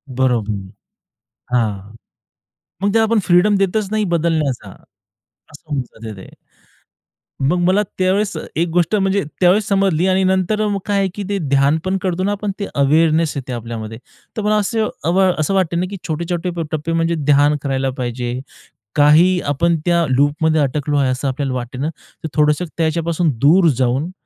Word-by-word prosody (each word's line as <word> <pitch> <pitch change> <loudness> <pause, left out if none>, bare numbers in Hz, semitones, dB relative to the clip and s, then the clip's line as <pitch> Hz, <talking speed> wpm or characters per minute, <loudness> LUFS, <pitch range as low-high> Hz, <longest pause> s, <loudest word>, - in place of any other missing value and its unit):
बरोबर 120 -5 +1 1.0
हां, 105 -3 -1 0.9
मग 200 - +1
ते 225 - +4
आपण 225 0 +2
फ्रीडम 180 +4 +4
देतच 195 +1 0
नाही 215 0 +1
बदलण्याचा 160 -5 0 0.6
असं 150 +2 -19
होऊन 140 - 0
जातं 110 -3 -10
ते. 95 - -11 1.1
मग 145 +7 +2
मला 190 +3 +3 0.2
त्यावेळेस 190 +1 +1 0.2
एक 170 +2 +1
गोष्ट 175 +4 +2
म्हणजे 195 -1 +1 0.2
त्यावेळेस 190 +4 +4
समजली 195 -4 +2
आणि 190 0 +2
नंतर 190 +3 +1
मग 200 -1 -1
काय 205 -1 0
आहे 195 - +2
की 205 - -4
ते 200 - 0
ध्यान 140 +2 +3
पण 190 +1 0
करतो 185 0 -1
ना 205 +1 +1
पण 205 -1 -1
ते 200 - -3
अवेअरनेस 155 +3 +3
येते 130 -2 -5
आपल्यामध्ये. 115 -2 -6 0.4
तर - - -1
मला 210 +1 +1
असं 215 +1 0 0.5
असं 155 +4 0
अ, - - +1
वाटते 180 -3 +1
ना 175 +2 0
की 200 - -6
छोटे-छोटे 170 +2 -2 0.2
टप्पे 155 +1 -3
म्हणजे 165 0 +1
ध्यान 145 -1 +3
करायला 135 -1 -1
पाहिजे, 120 0 -3 0.6
काही 160 +5 +5
आपण 165 +4 +1
त्या 170 -1 +3
लूपमध्ये 150 +4 +2
अटकलो 145 +1 -1
आहे 135 -2 +2
असं 130 +2 -2
आपल्याला 135 0 -2
वाटते 125 0 -5
ना, 145 +4 -1 0.4
तर - - -2
थोडंसं 150 +3 +2
त्याच्यापासून 165 +1 0
दूर 165 +7 +5
जाऊन 130 +7 0
165 Hz, 165 wpm, -18 LUFS, 140-190 Hz, 1.1 s, काही